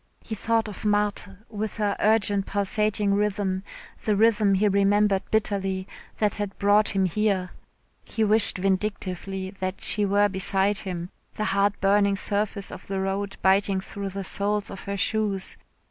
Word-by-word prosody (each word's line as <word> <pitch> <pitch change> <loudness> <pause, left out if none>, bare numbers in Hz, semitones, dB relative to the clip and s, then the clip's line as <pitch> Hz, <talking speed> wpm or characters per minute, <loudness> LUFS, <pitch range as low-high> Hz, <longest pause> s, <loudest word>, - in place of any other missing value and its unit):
He 225 - -6
thought 225 +1 0
of 210 - -8
Marthe 205 -1 +1 0.2
with 215 0 -4
her 205 -2 0
urgent 205 -2 +2
pulsating 205 +1 0
rhythm, 200 -2 0 0.4
the 210 - +1
rhythm 210 -2 +4
he 205 +2 +3
remembered 200 0 +3
bitterly, 195 -3 0 0.3
that 210 -2 +1
had 205 -2 -5
brought 205 +1 +3
him 190 -1 +3
here. 190 -1 0 0.5
He 225 - -2
wished 215 0 +3
vindictively 190 -1 -2
that 185 0 -3
she 210 - +3
were 205 +1 +3
beside 195 +1 0
him, 180 -2 -5 0.2
the 215 - -2
hard 200 0 +1
burning 200 0 +3
surface 200 0 -2
of - - -10
the 195 -1 -2
road 195 +1 -2
biting 195 0 +3
through 200 +1 -5
the 195 +1 -5
soles 205 +2 -1
of 195 - -7
her 200 0 -3
shoes. 205 -2 0
200 Hz, 155 wpm, -25 LUFS, 195-210 Hz, 0.5 s, rhythm